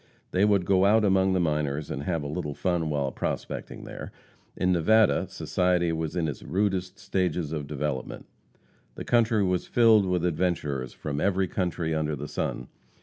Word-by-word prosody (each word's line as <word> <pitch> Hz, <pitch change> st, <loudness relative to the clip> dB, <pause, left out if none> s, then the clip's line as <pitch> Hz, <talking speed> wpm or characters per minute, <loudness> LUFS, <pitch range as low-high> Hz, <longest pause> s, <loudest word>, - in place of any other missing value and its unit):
They 95 Hz, +2 st, +3 dB
would 100 Hz, -3 st, +3 dB
go 95 Hz, 0 st, +3 dB
out 110 Hz, +2 st, +4 dB
among 95 Hz, -1 st, +3 dB
the 95 Hz, -, +2 dB
miners 75 Hz, -3 st, -1 dB
and 70 Hz, -, -3 dB
have 85 Hz, -4 st, -1 dB
a -, -, -4 dB
little 75 Hz, -1 st, -4 dB
fun 85 Hz, -4 st, 0 dB
while 70 Hz, -3 st, -1 dB
prospecting -, -, -4 dB
there. -, -, -8 dB, 0.5 s
In 90 Hz, 0 st, +2 dB
Nevada, 105 Hz, +5 st, +3 dB
society 90 Hz, -2 st, 0 dB
was 80 Hz, 0 st, -3 dB
in 85 Hz, -3 st, 0 dB
its 75 Hz, -, -5 dB
rudest 95 Hz, -1 st, -1 dB
stages 90 Hz, -5 st, -1 dB
of 75 Hz, -3 st, -4 dB
development. 75 Hz, -3 st, -4 dB, 0.7 s
The -, -, -7 dB
country 115 Hz, -3 st, +3 dB
was 90 Hz, -2 st, 0 dB
filled 110 Hz, -4 st, +5 dB
with 90 Hz, -1 st, 0 dB
adventurers 75 Hz, -7 st, -1 dB
from 75 Hz, -1 st, -4 dB
every 95 Hz, -1 st, +1 dB
country 85 Hz, -3 st, -2 dB
under 75 Hz, -1 st, -1 dB
the 75 Hz, +1 st, -6 dB
sun. 60 Hz, -, -3 dB
90 Hz, 170 wpm, -27 LUFS, 75-95 Hz, 0.7 s, filled